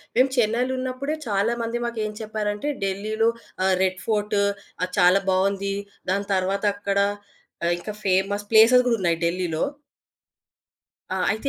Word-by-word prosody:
మేము 260 +2 +4
చెన్నైలున్నప్పుడే 255 +4 0
చాలా 205 +2 +1
మంది 230 +1 -2
మాకేం 220 -3 -2
చెప్పారంటే, 210 +2 -3 0.2
ఢిల్లీలో 215 +4 0 0.3
ఆహ్, 190 0 +3
రెడ్ 185 0 +1
ఫోర్ట్ 210 -1 0 0.5
అది 180 0 -1
చాలా 180 +2 +6
బావుంది. 195 +1 +1 0.4
దాని 200 +1 -1
తరువాత 195 +2 0
అక్కడ 200 -1 -1 0.6
ఆహ్, 170 - +2
ఇంకా 210 +3 -6
ఫేమస్ 195 +2 +1
ప్లేసెస్ 230 +3 +7
గూడున్నాయి 180 -8 +1
ఢిల్లీలో. 170 -2 -1 1.5
ఆ! - - -1 0.2
అయితే 220 +6 -3
205 Hz, 125 wpm, -24 LUFS, 190-230 Hz, 1.5 s, ప్లేసెస్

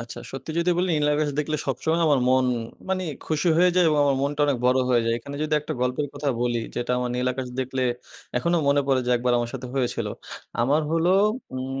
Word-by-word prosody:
আচ্ছা, 115 -1 -8
সত্যি 135 +3 -6
যদি 170 +1 +2
বলি 185 - +1
নীলাকাশ 150 0 +1
দেখলে 155 +1 0
সবসময় 160 +5 0
আমার 145 -3 +4
মন 130 0 +4 0.4
মানি 185 -1 -1 0.2
খুশি 155 +2 0
হয়ে 180 +2 +5
যায়। 180 -2 +5
এবং 150 -1 +2
আমার 140 -1 +2
মনটা 145 +1 -1
অনেক 140 - +1
বড় 125 +1 +4
হয়ে 120 -2 +3
যায়। 115 - +2
এখানে 140 +4 -8
যদি 155 0 -3
একটা 150 +1 -5
গল্পের 125 +4 0
কথা 145 0 -2
বলি, 120 -1 0
যেটা 120 0 -1
আমার 125 0 -2
নীল 125 +1 -1
আকাশ 130 0 -5
দেখলে 130 0 -2 0.5
এখনো 170 +7 +1
মনে 140 0 +4
পড়ে 135 -2 +3
যে - - +1
একবার 125 +1 0
আমার 120 0 -2
সাথে 130 -1 -5
হয়েছিল। 125 -3 -1 0.6
আমার 140 +6 +3
হলো 165 +2 +2 0.4
উম 135 +1 -4
140 Hz, 215 wpm, -24 LUFS, 125-155 Hz, 0.6 s, হয়ে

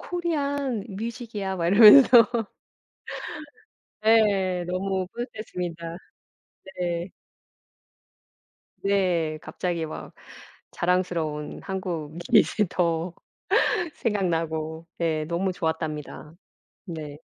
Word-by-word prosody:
Korean 285 - -2
music 230 +3 -6
이야." 190 -1 -2
막 170 -2 -1
이러면서 230 +4 +9 1.8
네 200 -5 +3
너무 185 +1 -2
뿌듯했습니다. 180 -8 -5 0.8
네. 175 0 -2 1.7
네 180 -6 +1
갑자기 170 -3 -3
막 155 - -8 0.6
자랑스러운 175 -4 -1
한국이 175 -4 +1 0.3
더 170 -1 0 0.8
생각나고 165 -6 -2
예 160 -2 0
너무 175 +4 -1
좋았답니다. 160 -2 -4 0.5
네. 155 -6 -7
180 Hz, 190 characters per minute, -25 LUFS, 165-205 Hz, 1.8 s, 이러면서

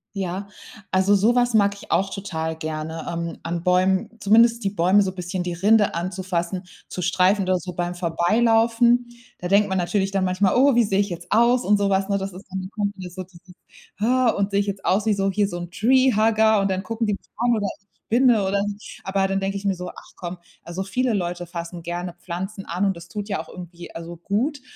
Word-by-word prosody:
Ja, 190 +1 -3 0.4
also 190 +2 +4
so 210 +5 +4
was 245 -1 +2
mag 200 -1 +4
ich 200 - -13
auch 195 +1 +2
total 160 -5 -3
gerne 160 0 -5
ähm, 170 0 -4
an 170 0 -4
Bäumen 185 +1 +2
zumindest 230 +3 +4
die 195 - +1
Bäume 195 +1 +3
so 190 -2 0
bisschen 180 0 -4
die 175 0 -3
Rinde 205 +3 +3
anzufassen, 185 0 -3 0.2
zu 180 - -5
streifen 185 +3 +3
oder 185 0 +1
so 180 +1 -7
beim 175 0 -3
Vorbeilaufen. 230 +7 +3 0.3
Da 180 - -4
denkt 200 +2 +3
man 190 0 0
natürlich 195 +2 0
dann 195 -1 0
manchmal: 185 +1 +2
„Oh, 265 +1 +5
wie 240 - +5
sehe 195 -2 0
ich 200 0 +1
jetzt 175 0 -8
aus" 240 +3 +4
und 205 +1 +4
so 200 -1 +1
was, 195 0 +1
ne, 200 0 +1
das 195 0 -4
ist 185 +2 -12
dann, 190 0 -3
da 185 - -6
kommt 205 -2 -2
mir 185 -2 -8
so 185 +1 -7
dieses 180 0 -18 0.4
ha, 250 +3 +3
„und 200 -2 0
sehe 200 - +2
ich 205 - 0
jetzt 200 -1 -4
aus 200 +3 +2
wie 215 - +4
so 195 0 0
hier 205 +1 +1
so 175 -3 -5
'n 175 0 -7
Treehugger 220 -1 +3
und 195 - 0
dann 190 0 -1
gucken 225 0 -2
die 210 - +1
mich - - -8
an 240 +1 +2
oder 205 -2 -1
ich 200 - -38 0.2
spinne 235 -4 +4
oder 200 +1 +1
so." 205 - -3 0.3
Aber 195 0 0
dann 195 0 0
denke 195 +1 -2
ich 200 - -8
mir 195 - +2
so: 180 0 -6
„Ach - - -13
komm, 180 -1 -6 0.3
also, 175 +3 -4
viele 240 +5 0
Leute 175 -2 -2
fassen 170 0 -6
gerne 175 +1 -4
Pflanzen 190 +3 -6
an 180 +4 -1
und 195 -2 +1
das 170 0 -11
tut 205 +3 -6
ja 195 - -1
auch 160 - -14
irgendwie, 175 -1 -10
also, 170 +1 -7
gut." 245 - -1
195 Hz, 235 wpm, -23 LUFS, 180-210 Hz, 0.4 s, Oh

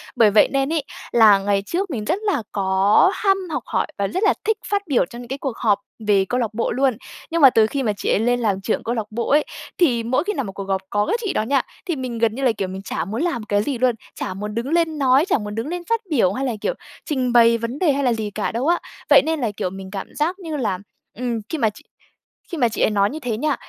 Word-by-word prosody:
Bởi 215 -3 +5
vậy 210 - +6
nên 275 +3 0
ấy 315 -3 0 0.3
là 215 -4 +6
ngày 200 0 +1
trước, 365 - -2
mình 220 -6 -3
rất 355 - 0
là 405 - 0
có 195 - +3
ham 390 -2 +2
học 305 - -2
hỏi - - -1
và 200 - 0
rất 370 - -2
là - - +5
thích 440 -1 +2
phát 405 -1 0
biểu 270 - +2
cho 235 +7 -11
những 245 - -9
cái 265 +3 -4
cuộc 270 -4 -4
họp 210 -3 +2 0.3
về 200 -2 +4
câu 250 - 0
lạc 225 -4 -2
bộ 230 - -1
luôn, 260 -3 +1 0.3
nhưng 335 0 0
mà 270 - +10
từ 220 -2 +4
khi 275 +3 -2
mà 215 -4 +1
chị - - -3
ấy - - +3
lên 245 +2 +1
làm 205 -5 0
trưởng 215 - -1
câu 235 - -2
lạc 220 -3 -3
bộ 235 +2 -3
ấy 295 +2 +4 0.3
thì 245 -10 +2
mỗi 255 +5 +1
khi 415 +3 -2
nào 275 - -2
một 200 - -6
cuộc 195 +1 -6
họp 195 0 -1
có 205 0 +1
cái 460 - 0
chị 415 -4 -2
đó - - +1
nha, 270 +4 +2 0.2
thì 345 - -1
mình 255 -4 -4
gần 225 -1 +1
như 270 - -4
là, 255 - +4
kiểu, 200 -4 -3
mình 190 +1 -6
chả 195 - -3
muốn 220 +6 -3
làm 335 -10 -1
cái 205 -1 0
gì 270 -1 -2
luôn, 250 -1 +2 0.2
chả 185 - -4
muốn 210 +2 -6
đứng 235 +4 -2
lên 330 -2 +1
nói, 270 +2 +4
chả 380 - +2
muốn 210 -2 -6
đứng 225 +4 -3
lên 350 +2 -3
phát 460 -1 +1
biểu 225 - +2
hay 265 +5 -2
là, 250 - -1
kiểu, - - 0 0.3
trình 255 -5 -1
bày 230 -1 +6
vấn 230 +4 -5
đề 330 -6 +3
hay 280 +1 0
là 245 -3 +3
gì 215 -2 -3
cả 205 0 -2
đâu 245 +5 -2
á. 345 +1 +3 0.3
Vậy - - +8
nên 320 0 0
là, 235 -5 -1
kiểu, 180 - -1
mình 190 0 -9
cảm 195 -2 -5
giác 340 +6 -1
như 325 -5 -5
là, 205 -8 -1 0.4
ừm, 240 -1 -2
khi 325 - -2
mà 225 -6 +2
chị 205 - -15 0.7
khi 340 - -4
mà 240 -3 +3
chị 215 - -4
ấy - - +4
nói 200 -1 +2
như 310 - -6
thế 240 -6 -3
nha, 295 +3 0
240 Hz, 290 wpm, -21 LUFS, 210-295 Hz, 0.7 s, mà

